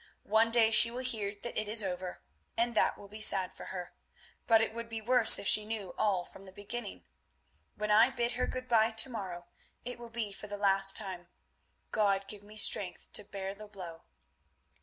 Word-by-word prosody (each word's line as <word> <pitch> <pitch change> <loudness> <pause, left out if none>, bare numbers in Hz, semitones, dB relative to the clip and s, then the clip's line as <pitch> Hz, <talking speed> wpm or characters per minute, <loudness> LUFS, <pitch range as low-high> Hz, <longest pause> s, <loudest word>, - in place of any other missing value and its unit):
One 220 +2 +3
day 225 -1 +4
she 230 +1 +7
will 250 +2 -5
hear 215 -5 -2
that 240 - -5
it 215 -1 -2
is 215 0 +6
over, 180 -1 -5 0.3
and 235 +1 +1
that - - +1
will 200 - -12
be 215 +2 -9
sad 190 -3 +4
for - - -11
her, 180 -2 -7 0.5
but 225 -2 +6
it 220 0 -1
would 230 0 -7
be 225 -1 -5
worse 240 +1 +5
if 200 - -4
she 215 - +7
knew 210 -4 -5
all 190 -4 0
from 195 - -14
the - - -10
beginning. 205 +2 -7 0.7
When 210 0 -2
I 220 +4 +6
bid 240 -2 -2
her 250 - -2
good 255 0 -6
bye 225 -2 +3
to 220 +4 +2
morrow, 185 -6 -6 0.4
it 245 0 -5
will 235 -1 -9
be 225 -3 -4
for 210 - -8
the 205 0 -5
last 195 -1 +2
time—God 195 +1 -4
give 205 0 -7
me 210 +1 -13
strength 190 -3 -1
to 210 - 0
bear 195 -1 -6
the 210 +1 -11
blow. 180 -5 -10
210 Hz, 200 wpm, -31 LUFS, 195-230 Hz, 0.7 s, she